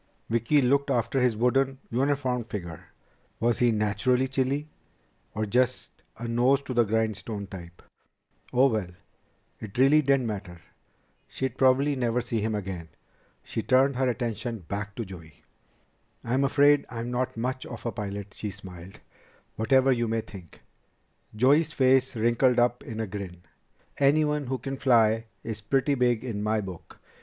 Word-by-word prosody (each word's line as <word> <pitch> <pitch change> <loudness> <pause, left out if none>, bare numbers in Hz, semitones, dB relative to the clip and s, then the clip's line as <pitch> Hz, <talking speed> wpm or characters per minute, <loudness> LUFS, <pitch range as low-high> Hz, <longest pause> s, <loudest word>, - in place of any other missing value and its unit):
Vicki 115 +5 +3
looked 140 +3 +2
after 120 +2 +1
his 125 -3 +2
wooden, 135 +3 +2
uniformed 130 -2 0
figure. 85 -6 -6 0.5
Was 120 0 +1
he 120 -1 +4
naturally 110 +5 +1
chilly, 135 +3 -1 0.7
or 110 0 -1
just 125 +4 0 0.3
a 120 +1 -5
nose 125 +4 +3
to 130 - -5
the 120 -1 +4
grindstone 110 -1 -2
type? 85 -3 -11 0.7
Oh, 125 +2 +4
well! 110 -8 +1 0.7
It 110 -1 -9
really 140 +4 +5
didn't 135 -3 +2
matter. 100 -5 -5 0.7
She'd 130 -2 -4
probably 135 +2 +3
never 120 -2 0
see 115 -2 -2
him 110 0 -1
again. 95 -5 -5 0.5
She 115 - -4
turned 130 +3 +3
her 130 -1 +2
attention 115 -2 -3
back 100 0 -4
to 115 - -4
Joey. 80 -5 -12 0.8
"I'm 130 +4 +1
afraid 145 +1 +4
I'm 120 0 -5
not 125 -1 -2
much 130 +3 -3
of 115 -2 -9
a 115 - -1
pilot" 100 -2 -6
she 105 - -5
smiled 95 -2 -11 0.5
"whatever 130 +4 +3
you 120 -2 +1
may 115 0 0
think." 95 -6 -13 0.7
Joey's 145 +7 +3
face 130 -1 +3
wrinkled 120 +3 +2
up 120 0 +2
in 110 -1 -7
a 110 - -1
grin. 95 -3 -7 0.6
"Anyone 150 0 +2
who 130 +1 -1
can 135 +1 -5
fly 115 -4 +3 0.2
is 110 -1 -5
pretty 135 +7 +1
big 125 -3 +1
in 110 -5 -4
my 110 +1 +1
book." 95 -4 -9
120 Hz, 150 wpm, -27 LUFS, 105-130 Hz, 0.8 s, really